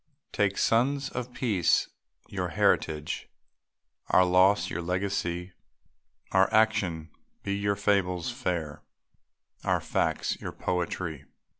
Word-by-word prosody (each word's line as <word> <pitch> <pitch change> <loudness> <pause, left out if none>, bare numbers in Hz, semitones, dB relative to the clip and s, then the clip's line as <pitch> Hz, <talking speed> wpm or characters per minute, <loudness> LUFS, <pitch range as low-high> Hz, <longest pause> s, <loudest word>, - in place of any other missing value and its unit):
Take, 100 -1 +1
sons 135 +4 +2
of 125 0 -5
peace, 110 -9 +2 0.4
your - - -3
heritage 75 -1 0 0.8
Our 90 - +5
loss, 95 +3 +4
your 85 - -3
legacy; 90 0 -2 0.8
Our 95 +1 +4
action 105 -7 +1 0.3
be 100 0 -1
your 100 0 0
fables 100 -1 +1
fair, 85 - -3 0.8
Our - - +2
facts, - - -1
your - - -5
poetry. 85 -4 -3
95 Hz, 105 wpm, -28 LUFS, 90-105 Hz, 0.8 s, Our